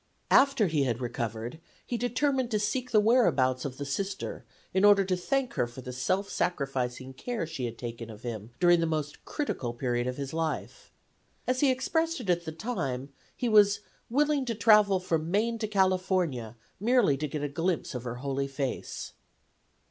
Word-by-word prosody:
After 275 -5 +5
he 155 -6 +1
had 120 -2 -1
recovered 120 +2 -4 0.3
he 245 - -3
determined 250 +2 0
to 215 - +1
seek 245 +5 -1
the 215 - +5
whereabouts 155 - +3
of 130 -2 -5
the 145 - -4
Sister 195 +7 -3 0.3
in 190 +1 +2
order 205 -1 +7
to 185 -1 +1
thank 265 +7 -1
her 120 - 0
for 120 +2 -10
the 125 0 -7
self 185 +11 0
sacrificing 130 -7 -2
care 225 - -3
she 155 -6 -4
had 115 -1 -5
taken 115 -1 -6
of 110 0 -11
him 110 -3 -5
during 175 -1 +5
the 165 - +1
most 155 -2 -3
critical 135 - -3
period 120 0 -1
of 125 - -3
his 140 0 -5
life. 165 - -3 0.5
As 255 0 0
he 280 - +4
expressed 320 +6 0
it 205 -7 0
at 170 -1 0
the 160 - -4
time, 155 - -3 0.3
he 245 - -1
was 205 -2 +5 0.3
"willing 290 +3 +2
to 235 -2 -2
travel 210 -3 +5
from 165 -3 -1
Maine 225 +5 +1
to 215 - -1
California 185 - +1 0.2
merely 225 - +4
to 150 +2 -2
get 145 +1 -4
a - - +1
glimpse 165 +4 -1
of 125 -2 -4
her 120 -1 -4
holy 135 +2 -2
face." 135 -1 -4
170 Hz, 185 wpm, -29 LUFS, -, 0.5 s, order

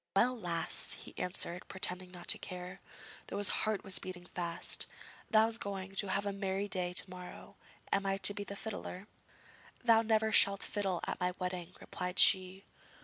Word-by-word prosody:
'Well, 250 +5 +4
lass,' 170 -7 -3
he - - -8
answered, 180 -1 0
pretending 185 -1 0
not 175 -1 -11
to - - +7
care, 180 0 -7 0.5
though - - -4
his 205 -1 +4
heart 215 -2 0
was 195 -2 +3
beating 180 -1 -7
fast; 170 -1 -1 0.4
'thou's 225 +1 +4
going 195 -1 -5
to 200 - +1
have 200 +2 0
a 200 - -1
merry 195 0 -2
day 180 -2 -2
to 180 - 0
morrow; 180 -1 -10 0.4
am 200 0 +1
I 195 0 +1
to 205 - +3
be 205 - -4
the 200 0 -6
fiddler?' 200 -2 -6 0.8
'Thou 230 -2 +6
never 220 -1 +2
shalt 200 -1 +5
fiddle 195 -4 -1
at - - -3
my 180 0 0
wedding,' 180 -1 -4
replied 180 0 -5
she. 190 +1 +5
190 Hz, 175 wpm, -34 LUFS, 180-205 Hz, 0.8 s, to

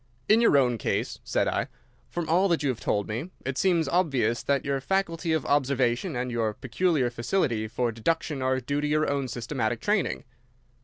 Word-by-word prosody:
"In 220 +2 +5
your 230 -11 +5
own 125 -4 +2
case," - - -2
said - - 0
I, - - 0 0.4
"from 170 -2 -3
all 180 +5 +3
that 170 -5 +1
you 140 - +1
have 125 - -2
told 105 -1 -1
me, 120 +11 -4 0.2
it 135 0 -2
seems 170 -5 +2
obvious 135 -9 +1
that 140 -2 0
your 140 -1 -1
faculty 165 0 -1
of 160 -3 0
observation 135 +2 +1
and 125 0 -2
your 110 -3 -1
peculiar 135 -1 0
facility 120 - 0
for 120 +1 -1
deduction 140 +4 -1
are 130 0 +1
due 140 +3 -2
to 150 - 0
your 155 +1 +2
own 140 -2 -1
systematic 120 -1 -2
training." 65 - 0
135 Hz, 190 wpm, -27 LUFS, 120-160 Hz, 0.4 s, In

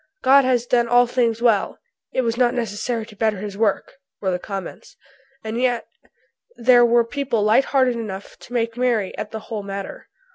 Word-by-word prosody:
"God 270 +1 +6
has 245 -2 +1
done 240 -1 +2
all 245 +1 +5
things 235 -2 0
well; 220 -5 +2 0.3
it 260 - 0
was 230 -1 -1
not 245 0 +2
necessary 230 0 -3
to 215 - -15
better 215 -1 0
his 200 +1 -6
work," 215 +4 -1 0.2
were 190 -2 -1
the 180 - -2
comments. 195 -1 -8 0.5
And 220 +2 -3
yet 245 -2 0 0.7
there 245 0 +5
were 235 0 +4
people 255 -3 -1
light 220 +6 +4
hearted 260 -3 +2
enough 200 -4 -7
to 245 - -13
make 230 -1 -1
merry 240 -6 0
at - - -5
the 220 -1 -7
whole 220 -1 -5
matter. 200 0 -7
230 Hz, 185 wpm, -21 LUFS, 210-245 Hz, 0.7 s, God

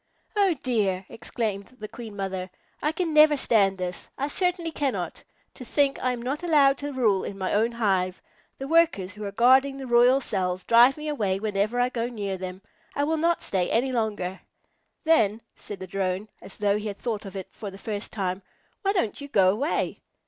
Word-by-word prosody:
"Oh 395 -4 +3
dear!" 200 -7 0
exclaimed 220 0 -4
the 215 - -6
Queen 225 -2 -9
Mother. 190 -2 -4 0.3
"I 300 - +1
can 330 0 -2
never 305 -1 +7
stand 200 -7 +3
this. 180 -1 -5
I 280 +2 -1
certainly 355 0 0
cannot. 280 -4 -3 0.3
To - - -10
think 275 +3 +1
I 255 - +2
am 240 -1 -5
not 275 +5 -2
allowed 285 -5 +4
to 290 0 -4
rule 220 -8 +2
in 195 - -6
my 185 -1 -2
own 225 +3 +2
hive! 190 -5 0 0.4
The 270 - -5
Workers 315 - +2
who 210 +1 -8
are 200 - -4
guarding 260 +5 +4
the 270 - -6
royal 245 +2 +5
cells 185 -6 -2
drive 240 +4 +6
me 305 0 -6
away 205 -10 0
whenever 215 +3 -1
I 245 0 +3
go 235 -2 -2
near 205 -5 -4
them. 185 0 -7 0.3
I 285 - +1
will 320 +2 +1
not 335 +2 +1
stay 185 -2 0
any 250 +4 +1
longer." 210 -6 -2 0.6
"Then," 225 -10 +3 0.2
said 195 -3 -8
a - - -4
Drone, 190 +2 -2
as - - -11
though 205 0 +1
he 215 - -5
had 200 -1 -5
thought 220 -4 -3
of 195 - -10
it 190 -2 -6
for 205 - -7
the 195 - -11
first 205 0 -5
time, 190 -2 -2 0.4
"why 395 -2 +1
don't 290 - -1
you 285 - -6
go 190 -8 +4
away?" 275 - -1
225 Hz, 200 wpm, -26 LUFS, 195-275 Hz, 0.6 s, never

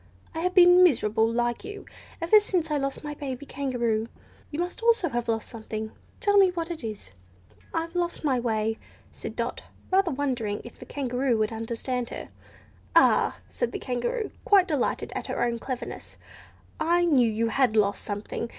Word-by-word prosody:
I 320 - -4
have 360 +2 -1
been 355 0 +8
miserable, 225 - +3
like 240 +3 -1
you, 415 0 -8 0.4
ever 385 +6 +7
since 360 -6 -1
I 300 - +2
lost 275 +1 -3
my 295 0 -4
baby 280 -2 -6
Kangaroo. 240 -6 -1 0.4
You 315 +3 -1
also 360 +6 -5
must 465 -1 +5
have 240 -8 -1
lost 225 -1 -1
something. 220 -1 -6 0.3
Tell 405 0 +3
me 390 -2 +7
what 340 -1 -3
it 325 -6 -6
is?" 215 - -6 0.6
"I've 330 0 -3
lost 345 -1 -2
my 265 -4 +2
way," 220 -2 -1 0.3
said - - -8
Dot; - - -3 0.3
rather 380 -1 +4
wondering 255 -8 -1
if 240 - -12
the - - -11
Kangaroo 255 -3 0
would 215 0 0
understand 235 +2 -3
her. - - -7 0.7
"Ah!" - - +4
said 485 - -2
the - - -1
Kangaroo, 250 - -2
quite 390 -3 +5
delighted 295 -7 -1
at - - -4
her - - -1
own 235 -1 0
cleverness, 255 +1 -6 0.6
"I 345 +2 +3
knew 260 -8 +4
you 225 +1 0
had 245 -1 +2
lost 205 -2 +2
something! 210 +2 -4
260 Hz, 175 wpm, -26 LUFS, 230-345 Hz, 0.7 s, been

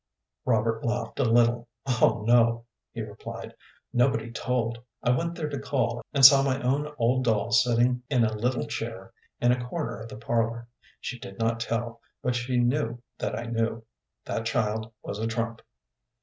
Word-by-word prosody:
Robert 115 -1 +1
laughed 120 +2 -2
a - - +4
little. 120 +1 +3 0.2
"Oh 120 -3 +2
no," 115 -1 +4 0.3
he - - -5
replied. - - -8 0.4
"Nobody 120 -2 +2
told. 120 -1 -1 0.2
I 120 - +3
went 170 +7 0
there 155 -3 -3
to 140 - -4
call, 120 -4 -1
and 140 -2 +6
saw 135 +1 +10
my 135 -1 +1
own 145 +4 0
old 125 +2 +2
doll 115 0 +1
sitting 120 +1 +3
in 125 -4 +3
a 110 -1 +1
little 125 +3 0
chair - - -5 0.3
in 120 - +4
a 125 0 0
corner 145 -3 -4
of 110 +1 -8
the - - -8
parlor. 115 +1 -1 0.3
She 125 - -5
did 95 -3 -9
not 115 0 0
tell, 115 0 -3 0.2
but 125 - +1
she 125 +1 -1
knew 120 -1 +1 0.2
that 105 - -2
I 115 - -3
knew. 115 -1 -2 0.4
That 115 0 -2
child 110 0 -1
was 100 - -5
a 110 - -1
trump." 115 0 -3
120 Hz, 175 wpm, -27 LUFS, 115-125 Hz, 0.4 s, saw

